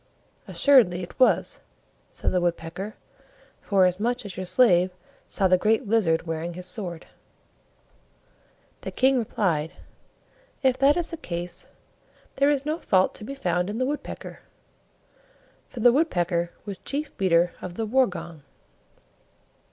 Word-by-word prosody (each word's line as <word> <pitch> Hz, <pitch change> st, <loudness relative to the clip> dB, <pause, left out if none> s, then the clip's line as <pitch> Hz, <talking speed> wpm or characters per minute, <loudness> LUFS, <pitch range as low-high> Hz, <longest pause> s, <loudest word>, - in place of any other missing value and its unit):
"Assuredly 225 Hz, -11 st, +4 dB
it 175 Hz, -, -11 dB
was," 255 Hz, -, +3 dB, 0.5 s
said -, -, -2 dB
the 180 Hz, -, +1 dB
Woodpecker, 175 Hz, +4 st, -3 dB, 0.7 s
"forasmuch 200 Hz, +5 st, +1 dB
as 195 Hz, -3 st, -7 dB
your 185 Hz, -1 st, -5 dB
slave 185 Hz, -2 st, +4 dB, 0.4 s
saw 195 Hz, -, +1 dB
the 185 Hz, 0 st, +4 dB
Great 220 Hz, +4 st, +1 dB
Lizard 185 Hz, -7 st, +2 dB
wearing 165 Hz, +1 st, -4 dB
his 180 Hz, 0 st, -7 dB
sword." 180 Hz, -3 st, -5 dB, 1.8 s
The -, -, -5 dB
King 260 Hz, 0 st, +3 dB
replied, 170 Hz, -9 st, -1 dB, 0.9 s
"If 260 Hz, -1 st, +2 dB
that 280 Hz, +3 st, +4 dB
is 345 Hz, 0 st, -2 dB
the 330 Hz, -, -5 dB
case, 175 Hz, -, -6 dB, 0.7 s
there 280 Hz, +1 st, +4 dB
is 285 Hz, -1 st, 0 dB
no 310 Hz, +2 st, -2 dB
fault 185 Hz, -1 st, +2 dB
to -, -, -10 dB
be 275 Hz, +6 st, -6 dB
found 180 Hz, -7 st, -1 dB
in 210 Hz, -, -4 dB
the 255 Hz, -, 0 dB
Woodpecker" 290 Hz, +2 st, -5 dB, 1.3 s
(for 240 Hz, -, -7 dB
the 240 Hz, +1 st, +6 dB
Woodpecker 175 Hz, -, +1 dB, 0.2 s
was 200 Hz, -3 st, -6 dB
Chief 295 Hz, +2 st, -4 dB
Beater 175 Hz, -2 st, +2 dB
of 180 Hz, -1 st, -7 dB
the 225 Hz, -, -2 dB
War 255 Hz, +4 st, +3 dB
gong). 170 Hz, -4 st, -8 dB
195 Hz, 135 wpm, -25 LUFS, 175-255 Hz, 1.8 s, the